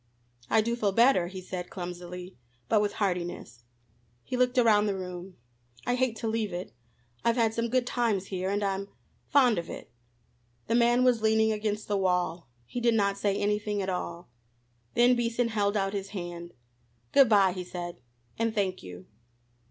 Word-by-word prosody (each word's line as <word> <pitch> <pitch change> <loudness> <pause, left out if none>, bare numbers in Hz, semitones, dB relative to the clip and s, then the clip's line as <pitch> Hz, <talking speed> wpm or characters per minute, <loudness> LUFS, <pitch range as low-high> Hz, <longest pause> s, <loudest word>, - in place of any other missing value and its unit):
"I 220 - +4
do 235 +2 -1
feel 205 -4 0
better," 230 -5 +4
he 185 +1 -7
said 180 -1 -6
clumsily, 180 0 -7 0.3
but 215 - +3
with 205 -1 0
heartiness. 175 - -3 0.6
He - - -4
looked 250 0 +2
around 215 -3 +5
the 200 - 0
room. 180 0 -7 0.5
"I - - +1
hate 250 -2 +1
to 225 - -4
leave 220 -2 -1
it. 175 +1 -6 0.5
I've 235 0 +3
had 225 -3 +2
some 230 +1 -1
good 255 +1 +1
times 230 -6 0
here, 185 -1 -2
and 205 +1 0
I'm 195 0 -1 0.4
fond 250 -8 +4
of 170 - -7
it." - - -8 0.7
The 230 - -1
man 240 +1 +4
was 245 -3 +3
leaning 220 0 +3
against 210 0 -2
the 205 - 0
wall. 180 -3 0 0.2
He 245 - -5
did 235 -1 +3
not 200 -2 +2
say 200 -1 +1
anything 210 0 0
at 190 -1 -2
all. 180 -1 -4 0.7
Then 245 +1 +5
Beason 235 0 0
held 205 -1 +1
out 195 0 0
his 195 -1 -4
hand. 175 -3 -7 0.6
"Good 275 -4 +6
bye," 195 -4 +5
he 185 -1 -5
said, 175 -1 -6 0.4
"and 230 -1 0
thank 190 -3 -1
you." 90 0 -10
205 Hz, 175 wpm, -28 LUFS, 180-230 Hz, 0.7 s, Good